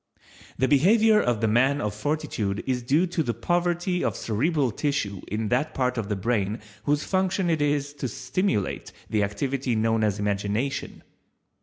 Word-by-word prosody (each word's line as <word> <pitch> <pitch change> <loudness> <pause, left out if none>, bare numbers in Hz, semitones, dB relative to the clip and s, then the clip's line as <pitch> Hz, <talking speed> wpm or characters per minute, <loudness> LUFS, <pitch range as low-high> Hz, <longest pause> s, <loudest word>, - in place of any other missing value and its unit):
The 130 - +2
behavior 210 - +5
of 120 -3 0
the 110 - +2
man 130 +6 +3
of 105 -5 -2
Fortitude 110 -5 -2
is 130 -2 0
due 145 +9 +2
to 175 -2 -1
the 120 -7 -1
poverty 175 - 0
of - - -1
cerebral 135 +4 0
tissue 105 -7 -2
in 110 +1 -2
that 130 +6 0
part 125 -1 0
of 110 -4 -3
the 105 - 0
brain 105 +1 -1 0.3
whose 145 0 +1
function 190 -1 0
it 160 -2 0
is 145 -1 0
to 130 - -1
stimulate 130 - -2 0.2
the 110 -2 +2
activity 130 +4 -1
known 110 0 +1
as 105 -2 +1
imagination. 105 +7 -2
130 Hz, 165 wpm, -25 LUFS, 110-150 Hz, 0.3 s, behavior